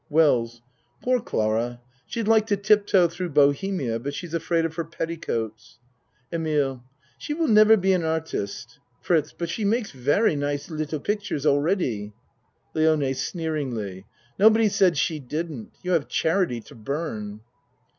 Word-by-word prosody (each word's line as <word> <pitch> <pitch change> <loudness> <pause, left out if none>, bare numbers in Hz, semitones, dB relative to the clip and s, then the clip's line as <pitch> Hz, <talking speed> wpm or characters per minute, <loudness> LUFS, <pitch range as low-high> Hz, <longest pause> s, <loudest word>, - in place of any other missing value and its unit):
WELLS 120 -7 +2 0.4
Poor 250 0 +2
Clara, 115 - -1 0.3
she'd 230 -3 -3
like 220 -1 +4
to 205 -2 +1
tip 205 +1 +3
toe 180 -3 +5
through 175 +2 -5
bohemia, 145 -3 +2
but 140 +4 -5
she's 175 -2 -7
afraid 165 0 +1
of 165 - -3
her 165 +1 -2
petticoats. 120 -10 -4 0.6
EMILE 145 -6 0 0.4
She 295 - -4
will 325 0 0
never 215 0 +7
be 190 0 +2
an 180 -2 +1
artist. 160 -4 -3 0.2
FRITZ 155 -4 +1
But 170 -1 -4
she 215 - -3
makes 215 +2 0
very 145 - +2
nice 145 +2 -3
little 155 -1 -3
pictures 205 -8 -2
already. 145 - +1 0.6
LIONE 155 -4 +2
(Sneeringly.) 130 - -3 0.3
Nobody 220 +1 +6
satd 190 -5 +3
she 155 +2 0
didn't. 150 -2 -5
You 180 - -2
have 165 -5 +2
charity 160 -8 0
to - - -15
burn. 110 -5 -5
160 Hz, 145 wpm, -25 LUFS, 135-185 Hz, 0.6 s, never